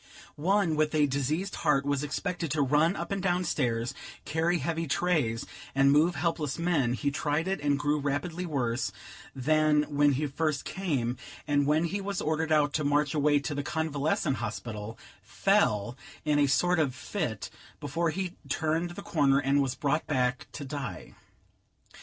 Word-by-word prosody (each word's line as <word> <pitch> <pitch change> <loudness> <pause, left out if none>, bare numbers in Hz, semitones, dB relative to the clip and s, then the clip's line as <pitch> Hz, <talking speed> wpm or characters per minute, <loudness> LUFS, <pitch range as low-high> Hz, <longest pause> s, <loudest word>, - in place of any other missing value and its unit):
One, 180 +1 +2
with 155 0 +1
a 150 -1 +4
diseased 145 +8 -1
heart, 140 -2 +2
was 140 0 0
expected 175 +3 -3
to 150 -2 +2
run 150 +7 +3
up - - -5
and 200 -1 -1
down 180 -1 +1
stairs, 120 -7 -1 0.3
carry 165 +3 +1
heavy 165 +2 -2
trays, 140 -8 0 0.3
and 135 0 +5
move 160 +5 +4
helpless 155 -3 -1
men; 165 -8 +1
he 140 +2 -1
tried 150 +3 -1
it, 190 -4 -1
and 145 -1 +2
grew 145 +1 +1
rapidly 145 +5 -2
worse 130 -5 -1 0.4
than 150 +2 +3
when 145 0 +4
he 145 +3 0
first 150 0 -1
came: 135 -11 -1 0.3
and, 145 -1 +2
when 155 +2 +3
he 195 +4 -2
was 195 -1 -3
ordered 160 +1 -1
out 150 -2 +3
to 155 - 0
march 145 0 +2
away 150 -1 +3
to 145 - -3
the 145 - -2
convalescent 150 -3 -1
hospital, 110 -1 -5 0.2
fell, 120 - +1 0.3
in 150 -1 +3
a 145 - +4
sort 175 +5 +2
of 140 -5 +1
fit, 145 - -4 0.3
before 170 0 -1
he 180 +1 -3 0.2
turned 160 +2 0
the 175 - -8
corner, 140 -4 +3
and 140 +1 +2
was 135 -2 -1
brought 150 +3 0
back 125 -3 0
to 145 - -6
die. 135 -2 -6
150 Hz, 170 wpm, -29 LUFS, 140-165 Hz, 0.4 s, and